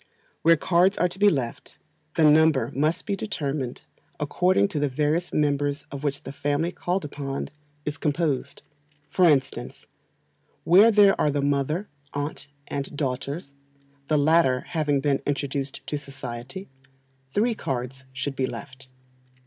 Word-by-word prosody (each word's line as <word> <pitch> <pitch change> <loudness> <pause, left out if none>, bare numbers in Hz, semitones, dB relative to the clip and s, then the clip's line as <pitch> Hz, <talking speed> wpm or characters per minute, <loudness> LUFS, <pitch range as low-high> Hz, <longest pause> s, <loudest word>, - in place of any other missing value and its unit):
Where 165 0 +6
cards 180 +5 +3
are 180 - +3
to 180 +2 -8
be 205 0 +7
left, 130 -9 -3 0.4
the 165 - +3
number 150 -5 +5
must 155 +5 0
be 200 - -1
determined 145 - -3 0.4
according 180 +6 +2
to 155 - -2
the 145 0 +1
various 150 +6 0
members 145 0 0
of 140 0 -6
which 140 0 -2
the - - -6
family 145 +4 -1
called 180 -1 -2
upon 140 -1 -5 0.3
is 150 +1 -3
composed. 150 -3 -1 0.5
For 180 +2 +5
instance, 135 -3 -1 0.8
where 195 +7 +7
there 205 -3 +6
are 150 - +3
the 145 -1 0
mother, 145 +7 0 0.3
aunt, 145 +1 -4 0.2
and 140 +1 -4
daughters 140 +2 -3 0.5
(the 155 - +2
latter 145 -4 +4
having 150 -4 +1
been 140 -1 +1
introduced 140 -1 -2
to 150 - -3
society), 135 +4 -7 0.7
three 230 +3 +3
cards 130 - -4
should 135 +1 -4
be 130 -1 0
left. 130 -1 -9
145 Hz, 140 wpm, -25 LUFS, 135-165 Hz, 0.8 s, be